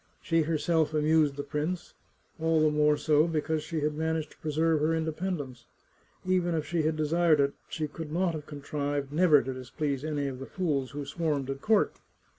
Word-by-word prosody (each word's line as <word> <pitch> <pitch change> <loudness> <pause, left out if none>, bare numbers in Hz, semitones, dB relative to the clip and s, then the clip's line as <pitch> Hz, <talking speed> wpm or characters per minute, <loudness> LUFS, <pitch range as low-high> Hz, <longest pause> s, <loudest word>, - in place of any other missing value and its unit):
She 165 -1 +1
herself 155 0 +1
amused 155 -1 +3
the 145 - -4
prince, 155 +5 -3 0.5
all 160 0 +2
the 155 -1 +4
more 150 0 +3
so 150 +1 +3
because 160 -1 -1
she 160 0 -3
had 150 +1 0
managed 160 0 -2
to - - -18
preserve 160 +1 +1
her 155 +2 +2
independence. 160 -6 -3 0.6
Even 180 -2 +1
if 155 -1 -1
she 170 -1 0
had 155 +1 +1
desired 155 0 +3
it 140 0 +2 0.2
she 155 -1 -2
could 155 +1 -8
not 175 +1 +1
have 155 -2 -6
contrived 145 -1 -3
never 155 -3 +5
to 130 - -4
displease 135 +2 -3
any 150 -2 -1
of 130 -2 -5
the 135 - -7
fools 145 -8 -1
who 145 +3 -5
swarmed 145 -3 -1
at 135 0 -6
court. 215 -2 +2
155 Hz, 190 wpm, -29 LUFS, 145-165 Hz, 0.6 s, never